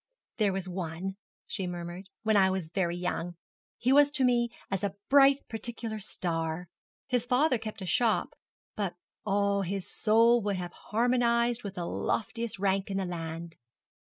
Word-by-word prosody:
'There 210 -4 +3
was 190 -1 -3
one,' 180 +1 -4 0.3
she 190 - -3
murmured, 175 +2 -6
'when 220 -1 +3
I 190 -2 +6
was 185 -4 -3
very 175 -2 0
young. 175 -1 -3 0.4
He 255 +2 +2
was 290 0 +7
to 285 -2 +1
me 240 -1 +3 0.2
as 195 0 -1
a 200 -1 -1
bright 275 0 +6
particular 225 0 -4
star. 165 -3 -3 0.4
His 245 -2 0
father 255 0 +3
kept 215 -2 -6
a - - -4
shop, 225 +4 +2 0.4
but, 195 -4 -2 0.3
oh, 200 0 +2
his 195 0 -3
soul 230 +2 +4
would 205 -1 -1
have 175 -1 -5
harmonized 235 +1 +1
with 200 -2 -6
the 175 - -3
loftiest 230 +4 -2
rank 195 0 +1
in 195 - -1
the 195 - 0
land. 165 -1 -5
200 Hz, 160 wpm, -29 LUFS, 180-235 Hz, 0.4 s, was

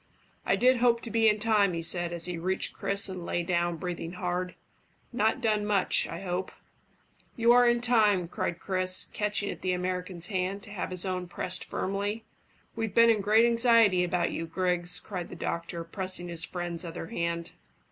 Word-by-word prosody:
"I - - +4
did 255 +1 +4
hope 235 -1 +3
to 230 - -7
be 225 -1 +4
in 210 - +2
time," 210 -3 +2
he 165 0 -3
said, 175 +1 +1
as 170 -1 +1
he 180 -1 -3
reached 185 +3 -1
Chris 200 0 0
and 185 -2 -6
lay 175 0 -2
down, 175 0 0
breathing 175 -1 -5
hard. 180 0 -3 0.6
"Not 225 +2 +1
done 215 -3 +1
much, 205 -2 +2
I 165 +2 -7
hope?" 185 0 -3 0.8
"You 235 0 +4
are 245 0 +6
in 240 0 +1
time," 210 -7 +3
cried 170 0 -3
Chris, 185 0 +1
catching 210 -1 -2
at - - -9
the 185 -1 0
American's 180 -1 -3
hand, 195 0 -2
to 205 - -9
have 200 - -4
his 185 0 -1
own 180 -1 -3
pressed 180 +1 0
firmly. 205 +3 -3 0.5
"We've 225 -2 -3
been 230 0 +7
in 215 -2 +1
great 215 +3 +4
anxiety 230 -5 +4
about 180 0 0
you, 165 - -4
Griggs," 180 0 +1
cried 180 -4 -6
the - - -9
doctor, 170 0 -4
pressing 185 +1 -2
his 170 -1 0
friend's 175 -1 -4
other 165 -1 -6
hand. 170 0 -3
185 Hz, 190 wpm, -28 LUFS, 175-215 Hz, 0.8 s, been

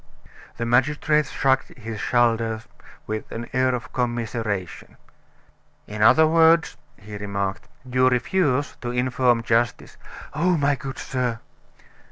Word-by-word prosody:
The 115 - -2
magistrate 150 +5 +2
shrugged 135 0 0
his 110 -2 -7
shoulders 115 -2 +1 0.4
with 110 0 -5
an 115 +1 -6
air 130 0 +2
of 120 - -8
commiseration. 115 -6 -3 0.9
"In 105 0 -6
other 160 +8 +6
words," 165 +1 +4 0.2
he 105 0 -9
remarked, 100 -1 -4 0.2
"you 130 0 +3
refuse 140 +2 0
to 120 - -4
inform 125 -1 +1
justice 115 0 0 0.2
" - - -14
"Oh, 175 +4 +1
my 145 -1 +2
good 135 0 -6
sir!" 125 -3 -2
125 Hz, 125 wpm, -23 LUFS, 115-135 Hz, 0.9 s, other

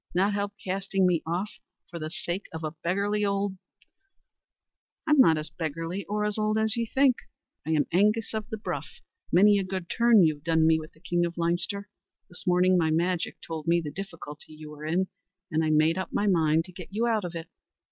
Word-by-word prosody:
Not 195 +3 +3
help 200 0 -2
casting 195 0 -1
me 175 -3 +2
off 180 +5 -2 0.4
for 170 - -6
the 155 0 -4
sake 175 +3 -4
of 160 0 -6
a 155 - -2
beggarly 200 +6 -1
old 200 -1 -1 0.7
" - - -55
"I'm 300 -2 +4
not 165 -11 +6
as 155 +1 -4
beggarly 165 +4 -4
or 210 +2 -1
as 210 +1 -1
old 215 0 +1
as 220 0 +2
ye 230 -1 -1
think. 265 +1 +3 0.5
I 160 - +1
am 150 -2 +2
Angus 210 +6 +2
of 220 -1 -4
the 220 - -4
Bruff; 210 - -4 0.4
many 205 +2 +6
a - - -1
good 185 -2 -5
turn 235 -4 +6
you've 155 -3 +1
done 160 -1 +3
me 160 0 +4
with 155 0 -10
the 155 - -24
king 175 0 0
of 170 0 -3
Leinster. 175 +4 -1 0.4
This 180 - -8
morning 180 +1 +4
my 160 -2 +2
magic 170 +2 0
told 160 -1 -6
me 170 +1 +4
the 155 -3 -5
difficulty 160 -4 -9
you 155 0 -10
were 150 0 -9
in, 180 +4 +1 0.4
and 160 0 +1
I 155 - +1
made 155 +3 +3
up 190 - -4
my 205 - 0
mind 165 -4 +3
to 185 - -11
get 180 -1 -9
you 220 +4 0
out 225 -3 +1
of 175 -1 -5
it. 165 0 -6
180 Hz, 215 wpm, -27 LUFS, 160-205 Hz, 0.7 s, not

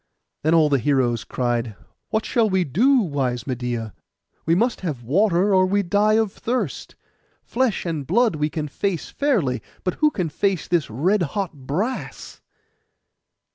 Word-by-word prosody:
Then 160 +2 +3
all 160 -2 +5
the 140 -2 +2
heroes 125 -3 +1
cried, 120 -3 -2 0.3
'What 220 0 -1
shall 230 -3 +2
we 190 -1 +2
do, 240 - +3
wise 135 - -2
Medeia? 120 -4 -3 0.5
We 165 - +4
must 235 +6 +1
have 150 -10 -4
water, 190 - +2
or 185 0 +4
we 200 +2 +1
die 205 +4 +2
of 220 -2 +2
thirst. 225 - -3 0.5
Flesh 245 -5 -1
and 155 -6 -3
blood 225 +1 +3
we 150 0 0
can 155 -1 -4
face 175 +3 -3
fairly; 200 - 0 0.2
but 185 - 0
who 305 - +6
can 180 - -2
face 190 +2 -1
this 170 -5 0
red 175 - +1 0.2
hot 195 -5 -1
brass? 155 - -4
170 Hz, 155 wpm, -22 LUFS, 135-210 Hz, 0.5 s, who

